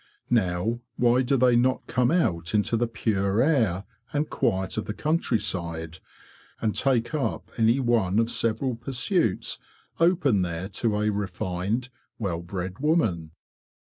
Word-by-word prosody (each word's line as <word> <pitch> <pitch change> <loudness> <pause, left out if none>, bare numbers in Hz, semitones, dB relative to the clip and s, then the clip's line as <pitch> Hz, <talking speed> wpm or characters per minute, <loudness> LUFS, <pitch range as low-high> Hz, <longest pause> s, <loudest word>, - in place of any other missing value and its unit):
Now, 110 +1 +1 0.2
why 120 +1 +3
do 135 +2 +2
they 125 -1 +4
not 130 +2 +2
come 125 -1 +1
out 110 - +1
into 105 +2 +2
the 120 +1 +1
pure 105 -3 0
air 115 - +2 0.3
and 150 +1 0
quiet 95 0 -1
of - - -4
the 105 - -4
countryside, 90 - -1 0.6
and 110 -2 0
take 125 -1 +1
up 150 -3 -2
any 115 +3 +3
one 115 -7 +2
of 115 +1 +2
several 115 +3 0
pursuits 125 - -1 0.4
open 165 - +3
there 90 +1 -3
to 110 +1 -1
a 105 0 +1
refined, 100 +4 -2 0.3
well 90 -6 -2
bred 90 +1 -5
woman? 110 - +1
110 Hz, 140 wpm, -26 LUFS, 95-125 Hz, 0.6 s, they